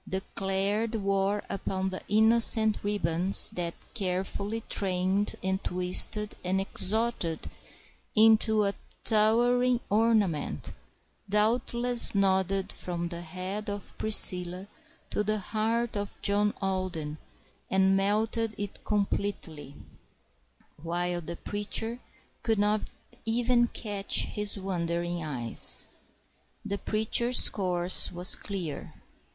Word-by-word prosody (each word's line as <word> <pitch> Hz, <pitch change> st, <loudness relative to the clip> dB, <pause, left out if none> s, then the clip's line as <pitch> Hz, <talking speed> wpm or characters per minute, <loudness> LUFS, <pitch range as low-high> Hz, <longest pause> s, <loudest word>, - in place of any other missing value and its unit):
declared 195 Hz, +3 st, -2 dB
war 200 Hz, 0 st, -1 dB
upon 190 Hz, -1 st, -3 dB
the 185 Hz, -, -6 dB
innocent 220 Hz, 0 st, +5 dB
ribbons 190 Hz, -2 st, +4 dB
that, 170 Hz, -1 st, -5 dB, 0.2 s
carefully 200 Hz, +1 st, -3 dB
trained 190 Hz, +1 st, -1 dB
and 190 Hz, 0 st, -2 dB
twisted 180 Hz, +4 st, +1 dB
and 185 Hz, +1 st, 0 dB
exalted 195 Hz, -3 st, -1 dB, 0.7 s
into 220 Hz, -1 st, +4 dB
a 200 Hz, 0 st, -1 dB, 0.3 s
towering 240 Hz, +3 st, +2 dB
ornament, 205 Hz, -, 0 dB, 0.6 s
doubtless 235 Hz, +3 st, +3 dB
nodded 195 Hz, 0 st, 0 dB
from 175 Hz, -1 st, -5 dB
the 170 Hz, 0 st, -7 dB
head 185 Hz, +5 st, -6 dB
of 205 Hz, -1 st, -7 dB
Priscilla 185 Hz, -3 st, +5 dB, 0.4 s
to 210 Hz, -, -1 dB
the 215 Hz, +1 st, -1 dB
heart 220 Hz, +3 st, -2 dB
of 205 Hz, -1 st, -6 dB
John 205 Hz, +1 st, +3 dB
Alden 180 Hz, -6 st, -4 dB, 0.5 s
and 190 Hz, 0 st, +2 dB
melted 215 Hz, +3 st, 0 dB
it 205 Hz, -1 st, -6 dB
completely, 195 Hz, -8 st, -3 dB, 1.1 s
while 175 Hz, +1 st, -2 dB
the 170 Hz, +1 st, -7 dB
preacher 225 Hz, +3 st, -2 dB, 0.4 s
could 225 Hz, -2 st, 0 dB
not 210 Hz, +1 st, +1 dB, 0.4 s
even 240 Hz, +1 st, +1 dB
catch 205 Hz, -4 st, +1 dB
his 210 Hz, 0 st, -5 dB
wandering 175 Hz, -2 st, -3 dB
eyes. 125 Hz, -7 st, -1 dB, 0.8 s
The 200 Hz, -1 st, -4 dB
preacher's 235 Hz, +3 st, +4 dB
course 180 Hz, -2 st, 0 dB
was 180 Hz, +1 st, +4 dB
clear. 185 Hz, -7 st, -6 dB
200 Hz, 100 wpm, -27 LUFS, 180-215 Hz, 1.1 s, innocent